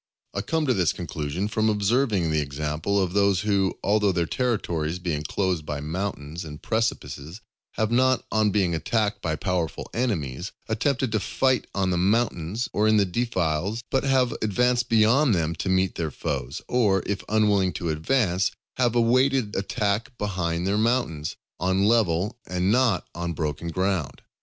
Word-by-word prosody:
I 100 - -1
come 160 +7 -1
to 130 - +3
this 90 -7 +2
conclusion 85 +1 -3
from 110 +1 +1
observing 105 - +1
the 75 0 +2
example 75 +7 -1
of 90 -2 0
those 100 -2 +3
who, 100 -2 +1
although 105 -1 +3
their 85 -2 0
territories 85 -8 -1
be 90 -2 -3
enclosed 85 +3 -1
by 75 -1 -4
mountains 80 0 -4
and 75 -2 -8
precipices, 110 -7 -2 0.3
have 110 0 -1
not, 130 0 +3
on 110 -1 +3
being 95 -4 +1
attacked 105 +5 0
by 80 -2 -1
powerful 90 -1 -2
enemies, 90 - -2
attempted 125 +2 0
to 110 - +1
fight 130 +5 +1
on 95 -1 +1
the 90 - +1
mountains 105 +1 0
or 105 +1 +2
in 110 0 +4
the 100 - +4
defiles, 95 0 -1
but 135 - +2
have 130 -3 +2
advanced 120 +3 +1
beyond 115 +3 +4
them 80 -1 0
to 95 - -2
meet 95 -1 +2
their 80 -2 -2
foes; 70 +1 -4
or, 105 -6 +2
if 100 -1 -2
unwilling 105 -3 +3
to 85 +2 -3
advance, 90 - +1 0.3
have 120 -2 +2
awaited 125 -1 +2
attack 105 +3 -1
behind 90 -4 -2
their 100 +2 +1
mountains, 110 - 0 0.2
on 95 +3 +1
level 105 0 +2
and 90 +2 0
not 115 -7 +2
on 85 0 -3
broken 75 +1 -3
ground. 90 -3 -1
100 Hz, 160 wpm, -25 LUFS, 85-115 Hz, 0.3 s, in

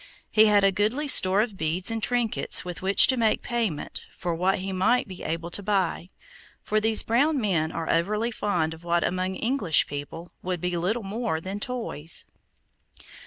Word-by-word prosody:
He 215 0 +5
had 205 -1 +4
a 195 - +4
goodly 215 +10 -1
store 190 -6 +5
of 215 -3 -3
beads 170 +6 0
and 225 0 -3
trinkets 240 -5 0
with 180 -1 -7
which 195 +1 +7
to 260 - +2
make 225 -2 +1
payment 225 -11 -3
for 175 -2 -3
what 185 +3 0
he 195 +1 -5
might 220 +7 +1
be 185 -2 -10
able 165 +1 -4
to 200 - -1
buy, 190 -3 -1 0.5
for 215 0 0
these 220 0 +3
brown 280 +6 +1
men 170 -8 0
are 165 -1 -5
overly 210 +8 0
fond 175 -8 -1
of 160 +1 -14
what 170 0 0
among 185 +1 -2
English 220 - +2
people 145 +4 -8
would 180 -1 -3
be 180 +1 -2
little 200 +7 -1
more 200 -4 -3
than 190 +4 -6
toys. 215 -10 -3
195 Hz, 180 wpm, -25 LUFS, 175-225 Hz, 0.5 s, which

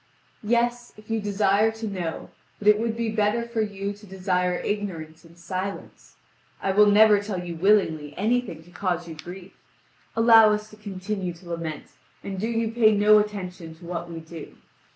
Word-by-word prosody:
"Yes, 240 +2 0
if 215 +1 -12
you 225 -1 0
desire 205 +1 +2
to 220 0 -6
know, 180 -5 -5 0.3
but 210 - -5
it 210 0 +6
would 230 0 -2
be 230 -1 -1
better 215 +2 +1
for 235 -1 -2
you 200 -1 -3
to 205 +1 -16
desire 180 -1 0
ignorance 175 -7 -4
and 170 0 -18
silence. 185 +3 -6 0.4
I 195 - -1
will 210 +2 +5
never 210 0 +6
tell 200 -3 -4
you 170 -1 -5
willingly 160 -6 +1
anything 220 -6 -1
to 175 - -19
cause 175 -2 -2
you 165 - -7
grief. 180 +4 -10 0.6
Allow 225 -1 +7
us 210 0 -4
to - - -12
continue 195 -2 -5
to 170 +1 -15
lament, 165 -3 -5 0.4
and 195 -1 -5
do 220 - -1
you 230 -1 -1
pay 220 -2 +4
no 210 +1 +6
attention 185 -5 -5
to 170 +2 -15
what 170 0 -5
we 165 -1 -7
do!" 160 -1 -11
200 Hz, 180 wpm, -25 LUFS, 175-215 Hz, 0.6 s, Allow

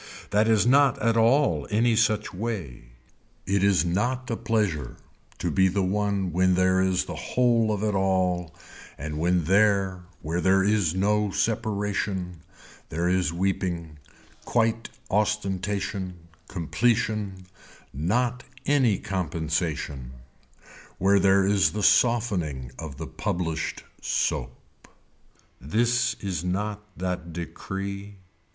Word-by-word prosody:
That 105 +2 +3
is 110 -1 +4
not 140 +1 +4
at 115 -3 +2
all 115 - +3
any 115 +2 +2
such 105 -1 +1
way. 90 - -5 0.6
It 100 +1 +1
is 100 -3 +3
not 120 +8 -1
a - - 0
pleasure 105 - -1 0.4
to - - -2
be 95 -1 +4
the 95 +1 0
one 100 -1 0
when 90 +1 +3
there 95 0 +3
is 95 -1 +1
the - - -6
whole 120 -3 +1
of 105 -1 -2
it 105 -1 +1
all 90 -3 0 0.4
and 75 +2 -5
when 90 +1 +2
there 95 0 +2 0.2
where 85 +3 -1
there 95 +2 +4
is 100 -5 +2
no 105 +2 +2
separation 100 -4 -2 0.5
there 85 +3 -1
is 90 -2 +1
weeping, 85 -3 -2 0.4
quite 115 -1 0 0.2
ostentation, 100 -2 -1 0.3
completion, 105 +1 -1 0.5
not 120 - 0 0.2
any 130 -8 +3
compensation, 80 -7 -3 0.8
where 100 +1 +4
there 95 0 +4
is 100 0 +3
the 105 0 -2
softening 90 - +2
of 75 -4 -7
the 80 - -5
published 85 -4 -3 0.2
soap. 60 0 -1 1.0
This 120 - +1
is 90 -5 -3
not 105 +3 -2 0.2
that 90 -2 -3
decree. 100 +4 -6
95 Hz, 120 wpm, -26 LUFS, 90-105 Hz, 1.0 s, is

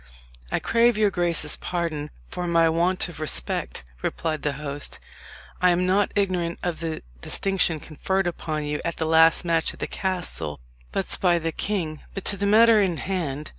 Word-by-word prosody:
"I - - +1
crave 235 -1 +3
your 210 -2 +3
grace's 170 -4 +2
pardon 165 -4 -3 0.2
for 175 - -5
my 165 -1 +4
want 175 +3 +1
of 170 -3 -10
respect," - - -1 0.2
replied 155 -3 -2
the 145 - -1
host. 145 0 -5 0.6
"I 180 - +5
am 180 +1 +2
not 195 +2 +2
ignorant 180 -4 0
of 175 -3 -2
the 165 -1 -4 0.2
distinction 190 -5 +1
conferred 190 +6 -2
upon 155 -3 -3
you 150 0 -3
at 170 - -3
the 160 - -1
last 160 +1 +5
match 165 -2 +1
at - - -20
the - - -1
castle 175 - -3 0.3
butts - - 0
by 175 -2 +3
the 165 0 -2
king. 160 -4 -2
But 195 - -5
to 200 - +5
the 200 +1 0
matter 220 +1 +6
in 180 -4 0
hand. 155 -7 -3
170 Hz, 175 wpm, -24 LUFS, 155-190 Hz, 0.6 s, matter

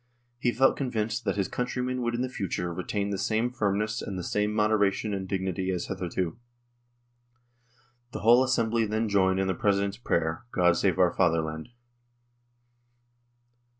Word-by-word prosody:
He 120 -1 +1
felt 135 +2 +3
convinced 115 -3 -2
that 100 - 0
his 100 -2 0
countrymen 125 +1 -2
would 120 0 -1
in 120 - -1
the - - -1
future 90 -7 -3
retain 100 +3 -2
the 100 - -2
same 110 +4 0
firm 100 -5 0
ness 110 +1 -2
and 95 - -5
the 90 - -4
same 105 +4 0
moderation 105 -1 +1
and 95 -1 -3
dignity 95 -1 -2
as 90 -2 -1
hitherto. 90 +2 -3 1.7
The - - -6
whole 120 +4 +6
Assembly 115 -3 +1
then 110 +2 0
joined 95 -2 +3
in 95 - +1
the 95 - 0
President's 100 +1 0
prayer, 80 -4 -1
" - - -40
God 90 -1 +4
save - - +1
our - - +4
Fatherland." 80 0 0
100 Hz, 160 wpm, -27 LUFS, 95-115 Hz, 1.7 s, whole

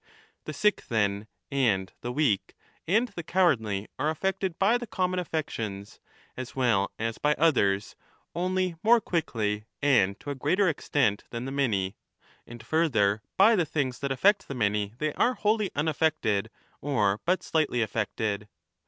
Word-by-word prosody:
The - - -5
sick, 210 0 +1
then, 105 -2 0 0.2
and 110 -9 +1
the 120 - -4
weak 125 -7 0 0.3
and 220 +8 +3
the 195 -4 -6
35 - - -21
cowardly 110 - +2
are 150 - +1
affected 190 +2 -2
by 220 +5 +3
the 240 - -6
common 185 -2 -1
affections, 110 - -4 0.4
as 130 -1 -7
well 115 -7 +2
as 115 0 -3
by 150 0 +2
others, 100 -11 +2 0.4
only 185 0 0
more 235 +2 +5
quickly 110 - -2
and 115 -10 +3
to 145 - -6
a - - -4
greater 175 +9 +2
extent 140 - 0
than 120 +1 -5
the 135 - -4
many, 105 -9 0 0.5
and 120 -1 -11
further, 110 -10 +2 0.2
by 215 +4 +6
the 180 - +2
things 140 -5 -2
that 140 -1 -2
affect 200 +10 +3
the 140 - -5
many 105 -2 0
they 150 +2 -1
are 250 +1 +2
wholly 215 -2 +1
unaffected 145 -9 0 0.3
or 105 -8 +1
but 180 +1 +1
slightly 145 -7 +1
affected. 105 -1 -2
140 Hz, 155 wpm, -27 LUFS, 105-170 Hz, 0.5 s, by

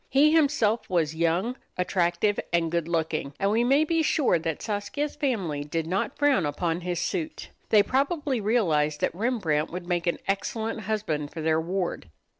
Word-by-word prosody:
He 290 +3 +5
himself 280 -8 +2
was 165 -4 +1
young, 170 +9 0 0.2
attractive, 180 +2 +1
and 170 -1 +1
good 170 -1 -1
looking; 160 -4 -2
and 195 +1 +2
we 225 +2 +3
may 275 +5 +4
be 330 +1 +1
sure 295 - +2
that 160 -1 -3
Saskia's 210 +8 -3
family 190 - -1
did 160 +2 -2
not 190 - -2
frown 290 - +3
upon 165 +3 -1
his 175 -1 -2
suit. 315 -3 -3 0.2
They 210 -2 +6
probably 275 - 0
realized 160 -9 +1
that - - +1
Rembrandt 180 -8 0
would 175 0 -6
make 175 -1 -1
an 170 - +1
excellent 220 +3 -2
husband 155 -9 -1
for 160 - -7
their 160 0 +2
ward. 175 - -3
185 Hz, 170 wpm, -26 LUFS, 165-240 Hz, 0.2 s, They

